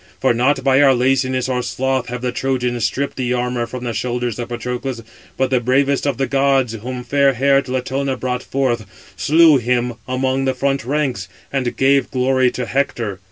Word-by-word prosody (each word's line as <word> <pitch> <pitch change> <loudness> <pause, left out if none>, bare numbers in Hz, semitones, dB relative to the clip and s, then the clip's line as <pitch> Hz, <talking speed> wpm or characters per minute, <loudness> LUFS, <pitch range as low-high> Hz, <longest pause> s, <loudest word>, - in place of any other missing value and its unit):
For - - +3
not 130 +3 +1
by 135 +1 +4
our 135 -2 +5
laziness, 130 0 +1
or 125 -1 -1
sloth, 130 +1 -1
have 125 0 -5
the 125 - 0
Trojans 125 -3 -1
stripped 140 +1 -1
the 125 -1 0
armour 125 -1 -1
from 125 +2 -7
the 120 -1 -3
shoulders 120 0 -2
of 120 - -4
Patroclus; 125 0 -4 0.3
but 130 0 0
the 130 - +3
bravest 135 +3 +1
of 140 -4 -1
the 135 - +1
gods, 135 -3 +1
whom 125 +3 -6
fair 140 +1 +2
haired 135 +1 +2
Latona 130 +1 -2
brought 125 0 -2
forth, 120 -6 -1 0.3
slew 155 - +5
him 125 0 0
among 130 +1 0
the 130 -1 0
front 135 +1 0
ranks, 130 -8 -1 0.3
and 130 -3 -1
gave 135 0 +3
glory 130 0 +2
to 125 0 -4
Hector. 115 -6 -2
130 Hz, 185 wpm, -19 LUFS, 125-135 Hz, 0.3 s, our